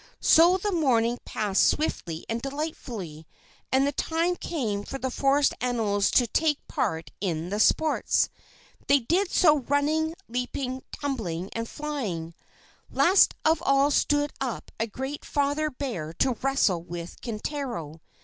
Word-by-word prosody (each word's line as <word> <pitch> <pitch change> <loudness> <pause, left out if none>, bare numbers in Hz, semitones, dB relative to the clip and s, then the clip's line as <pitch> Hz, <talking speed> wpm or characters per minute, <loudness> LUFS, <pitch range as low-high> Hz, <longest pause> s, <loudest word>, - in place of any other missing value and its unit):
So 345 +3 +6
the 410 +2 -2
morning 245 -8 +2
passed 205 -3 0
swiftly 170 - -1
and 230 +1 -2
delightfully, 235 - -5 0.4
and 265 +1 +4
the 285 - +1
time 335 +4 0
came 225 -14 -3
for 270 - -6
the 260 -1 -3
forest 275 +2 +2
animals 220 -5 +1
to 245 - +4
take 295 +5 0
part 160 0 -2
in 170 -3 -2
the 205 +2 -2
sports. 310 +7 +3 0.6
They 280 - +6
did 350 - +1
so 305 -6 +4
running, 300 +4 0
leaping, 250 +2 -3
tumbling, 200 - -4
and 230 0 -4
flying. 215 - -4 0.6
Last 380 +3 +4
of 320 0 +3
all 275 +1 +3
stood 290 +1 +2
up 255 -4 -4
a 225 - 0
great 265 +6 -5
father 290 +1 0
bear 235 - -5
to 255 - +1
wrestle 265 -10 +2
with 170 0 -8
Kintaro. 215 - -5
265 Hz, 140 wpm, -26 LUFS, 205-295 Hz, 0.6 s, So